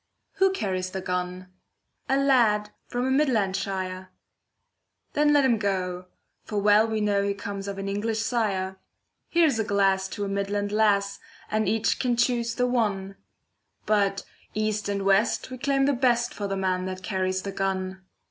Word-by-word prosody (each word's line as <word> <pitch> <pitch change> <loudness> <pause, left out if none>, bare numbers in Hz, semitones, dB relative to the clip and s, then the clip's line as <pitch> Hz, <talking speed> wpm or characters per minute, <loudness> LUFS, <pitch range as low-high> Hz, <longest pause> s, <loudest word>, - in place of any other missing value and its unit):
Who 385 0 +4
carries 185 - -2
the 190 - -4
gun? 180 0 -3 0.6
A 270 - +3
lad 230 -7 +3 0.2
from 245 +1 -2
a 265 - 0
Midland 245 -9 +2
shire. 185 -1 -4 1.0
Then 295 0 +3
let 290 -2 +5
him 235 -4 +3
go, 185 -3 -2 0.4
for 210 - -2
well 210 +2 +5
we 220 -1 -1
know 205 -1 +2
He 200 0 -1
comes 200 0 -6
of 200 -1 -4
an 195 0 -4
English 210 +3 -1
sire. 200 -5 -1 0.5
Here's 320 -8 +3
a - - +2
glass 195 -2 +2
to 205 +1 -4
a - - -3
Midland 200 +1 -2
lass, 205 -2 +2 0.3
And 215 0 +1
each 215 -2 +1
can 245 -2 +1
choose 235 -1 +1
the 250 - +1
one, 205 -6 -1 0.7
But 200 -2 +1 0.3
east 215 -1 -1
and 200 -1 -1
west 195 +6 +2
we 255 - -7
claim 275 0 +2
the 285 - +3
best 240 -2 +2
For 205 - -4
the 195 0 -2
man 185 -1 0
that 185 0 -5
carries 185 -1 -1
the 200 - -4
gun. 190 -1 -2
205 Hz, 170 wpm, -26 LUFS, 190-230 Hz, 1.0 s, let